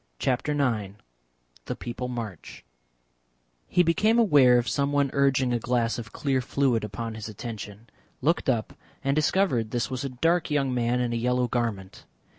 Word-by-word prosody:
CHAPTER 130 - 0
IX 110 -8 -1 0.7
THE - - -4
PEOPLE 120 +1 -5
MARCH 115 - -7 1.0
He 180 - +3
became 210 +7 +3
aware 145 - +6
of 120 - 0
someone 140 -1 +1
urging 135 -3 +2
a 120 - +1
glass 120 0 0
of 115 -2 -8
clear 135 -3 0
fluid 125 -3 +1
upon 110 +3 -5
his 110 0 -7
attention, 110 0 -8 0.3
looked 160 +1 +1
up 115 -4 0 0.3
and 135 0 +1
discovered 150 - +1
this 120 +2 -2
was 130 0 -3
a 135 - -2
dark 165 +7 +1
young 140 -3 +1
man 120 0 +1
in 120 -1 -1
a - - 0
yellow 125 +1 +1
garment. 115 -6 -3
125 Hz, 160 wpm, -26 LUFS, 115-140 Hz, 1.0 s, aware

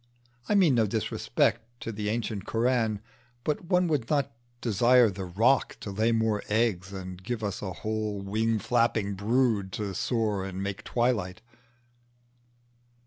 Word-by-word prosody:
I 210 - +3
mean 180 -8 +5
no 115 -3 +3
disrespect 110 +1 0 0.2
to 115 - -4
the 105 -1 -3
ancient 110 -3 -2
Koran, 115 -3 +1 0.4
but 150 +5 -1
one 180 0 +2
would 145 -8 -1
not 145 -3 +1 0.3
desire 120 0 +4
the 95 0 -5
roc 115 +10 +2
to 100 - -5
lay 110 +4 +1
more 110 -2 +1
eggs 105 -4 +1
and 95 -2 -7
give 115 +1 -3
us 100 -1 -3
a 95 - -4
whole 110 +2 -3
wing 110 +3 0
flapping 110 -2 +1
brood 105 -1 +1
to 105 -2 -3
soar 105 -1 0
and 95 0 -4
make 100 0 -4
twilight. 110 -5 -1
110 Hz, 145 wpm, -28 LUFS, 100-120 Hz, 0.4 s, mean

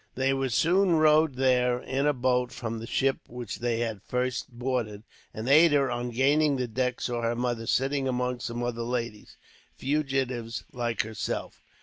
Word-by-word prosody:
They 130 +1 +1
were 135 -1 -1
soon 175 +7 +3
rowed 155 -2 +4
there, 125 -1 +2
in 135 +3 -1
a - - +5
boat 125 -1 +1
from 115 -2 -5
the 115 - -7
ship 135 +2 +1
which 120 -3 -6
they 120 -1 0
had 110 -4 -3
first 125 +3 -2
boarded; 120 -4 -3 0.3
and 110 +2 -6
Ada, 145 -2 +5
on 120 0 -2
gaining 140 +4 +3
the 125 -2 -1
deck, 125 +2 -1
saw 120 -1 -2
her 115 0 0
mother 120 -2 -2
sitting 135 +2 +1
among 125 -1 -1
some 120 0 -4
other 120 -1 -2
ladies, 115 -3 -4 0.4
fugitives 130 -5 -1
like 120 -3 -1
herself. 110 0 -5
125 Hz, 165 wpm, -27 LUFS, 120-135 Hz, 0.4 s, a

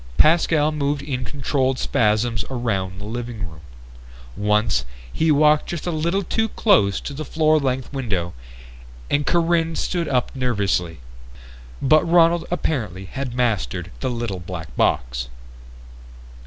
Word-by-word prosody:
Pascal 155 -1 +4
moved 145 -1 -1
in 130 -3 -3
controlled 135 -2 0
spasms 110 0 +1
around 100 -7 -2
the 100 - -7
living 115 -3 -5
room. 80 -2 -12 0.8
Once, 105 - +1 0.3
he 160 0 +2
walked 150 +1 +4
just 170 -3 -4
a 175 - -1
little 170 +5 0
too 225 +5 0
close 100 - +3
to 145 - -6
the 150 +2 -5
floor 155 +1 +2
length 130 -1 -2
window 100 -11 -2 0.8
and 145 0 +1
Corinne 165 -1 +2
stood 170 0 -1
up 130 +1 0
nervously. 100 - -1 0.8
But 155 +3 +5
Ronald 170 0 +4
apparently 110 - -2
had 130 +4 -5
mastered 110 - -1
the - - -1
little 115 -6 -3
black 85 -2 -8
box. - - 0
130 Hz, 130 wpm, -22 LUFS, 105-155 Hz, 0.8 s, But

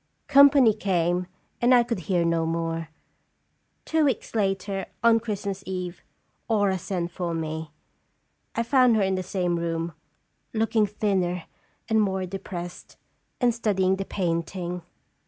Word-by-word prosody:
Company 280 -4 +7
came, 180 -3 0 0.3
and 245 +1 +6
I 240 - +6
could 230 -4 -3
hear 175 -3 +2
no 165 -1 +1
more. 165 0 -2 1.0
Two 320 -1 +2
weeks 265 -6 -1
later, 195 -2 -1 0.2
on 230 -1 +6
Christmas 200 -3 -4
Eve, 180 -2 -4 0.5
Aura 205 -4 +2
sent 175 -1 -3
for 170 -2 -3
me. 160 -1 -4 0.9
I 230 - +1
found 250 -1 +4
her 215 - +3
in 190 0 +1
the 185 - -1
same 180 -2 -1
room, 165 0 -2 0.6
looking 220 -1 +2
thinner 190 -4 -1 0.4
and 220 -1 +3
more 190 -2 0
depressed, 175 -2 -7 0.4
and 245 -2 +3
study 210 -5 0
ing 190 +1 +3
the 195 - -3
painting. 175 0 -2
190 Hz, 140 wpm, -26 LUFS, 175-220 Hz, 1.0 s, Company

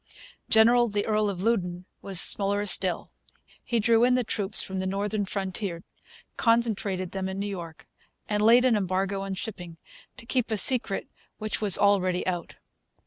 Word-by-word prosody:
General 235 +2 +4
the 205 -1 -3
Earl 215 -1 0
of 190 -2 -5
Loudoun 180 -6 -2 0.2
was 195 -3 +2
slower 200 +1 +4 0.2
yet. 185 -3 -1 0.7
He 240 - -2
drew 230 +1 +2
in 250 0 +3
the 250 - 0
troops 210 -2 -1
from 190 0 +4
the 190 - -3
northern 205 +2 -3
frontier, 190 -2 -5 0.5
concentrated 215 -6 -1
them 190 -1 -5
in 190 - -6
New 200 - -4
York, 175 -5 -9 0.4
and 210 0 -2
laid 235 +4 +4
an 250 -3 +2
embargo 195 0 -2
on 195 -1 -5
shipping 180 -4 -8 0.4
to 250 - -11
keep 250 0 -2
a 220 - -2
secret 230 -3 +3 0.3
which 215 0 -4
was 205 -3 +5
already 190 -3 +1
out. 175 -2 -5
200 Hz, 165 wpm, -25 LUFS, 190-220 Hz, 0.7 s, was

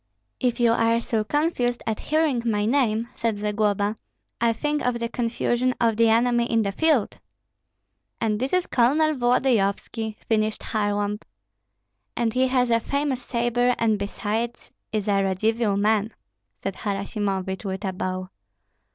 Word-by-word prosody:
"If 250 -2 0
you 235 -1 +4
are 230 0 +3
so 230 -2 -1
confused 245 -2 0
at 220 -1 -2
hearing 305 -5 +1
my 210 -3 0
name," 230 -2 +1
said 230 -2 -1
Zagloba, 210 0 0 0.6
"think 295 +5 -1
of 250 -1 0
the 235 0 -2
confusion 240 +1 0
of 230 -2 +2
the 230 +1 +4
enemy 235 +1 +3
in 225 -1 +3
the 200 - -1
field." 295 -1 +1 1.0
"And 215 -2 0
this 260 +2 -2
is 365 -1 +2
Colonel 300 +6 +3
Volodyovski," 230 -4 0
finished 215 -1 0
Kharlamp. 205 -1 -1 1.0
"And 230 -2 0
he 260 +1 +3
has 250 -2 +1
a 230 - +4
famous 280 +1 -1
sabre, 245 0 +1
and 220 -2 +1
besides 215 +3 -3 0.2
is 215 -1 -2
a 200 -1 +3
Radzivill 210 +2 +1
man." 215 +1 +1 0.5
said 195 -1 -3
Harasimovich, 195 -1 -2
with 190 0 -4
a 190 - -2
bow. 185 0 -4
230 Hz, 145 wpm, -24 LUFS, 205-245 Hz, 1.0 s, you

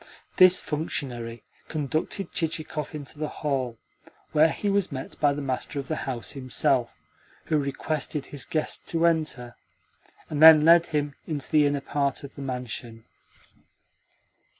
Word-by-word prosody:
This 185 -1 +7
functionary 120 -7 -4 0.2
conducted 155 +5 -2
Chichikov 155 -2 -3
into 145 0 -8
the 155 - -1
hall, 130 -6 -2 0.5
where 160 +1 +5
he 205 - -3
was 200 -3 +1
met 135 -1 -6
by 145 -1 +4
the 145 0 -4
master 135 +2 -3
of 140 - -4
the 155 - -2
house 120 -3 -3
himself, 130 -2 +1 0.5
who 155 - +1
requested 145 +1 -3
his 145 - -3
guest 155 -1 -3
to 165 0 +1
enter, 155 -8 0 0.7
and 150 -1 -3
then 155 -1 +10
led 170 +1 +6
him 145 -3 -1
into 150 -4 -4
the 150 -2 +5
inner 145 -1 -1
part 140 -1 -1
of 140 - -9
the - - -9
mansion. 125 -3 -6
145 Hz, 145 wpm, -26 LUFS, 135-160 Hz, 0.7 s, then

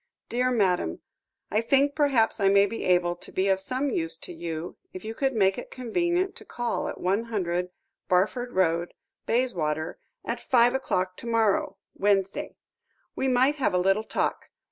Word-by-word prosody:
"DEAR 250 +2 +1
MADAM, 185 - +1 0.5
"I 210 +3 +2
think 275 +4 +3
perhaps 275 -8 +2
I 195 -1 +4
may 200 0 +6
be 225 +3 -5
able 175 -1 +3
to - - -10
be 190 +1 0
of 190 0 +3
some 255 +7 -1
use 165 -5 -2
to 175 - -9
you 165 0 -5 0.2
if 185 +2 -8
you 220 - -4
could 265 +2 -1
make 195 0 +3
it - - -9
convenient 345 - -1
to - - -10
call 240 -1 -3
at - - -6
100, 185 -3 -1 0.4
Barford 215 +7 +1
Road, 170 -3 +1 0.3
Bayswater, 165 -11 0 0.3
at - - -2
five 245 -1 +4
o'clock 185 -8 -1
to - - -8
morrow 220 -4 +1 0.2
(Wednesday). 195 -1 0 0.6
We 265 - 0
might 260 +3 +3
have 265 - +1
a - - +4
little 195 +4 +2
talk. - - -2
205 Hz, 165 wpm, -27 LUFS, 180-250 Hz, 0.6 s, may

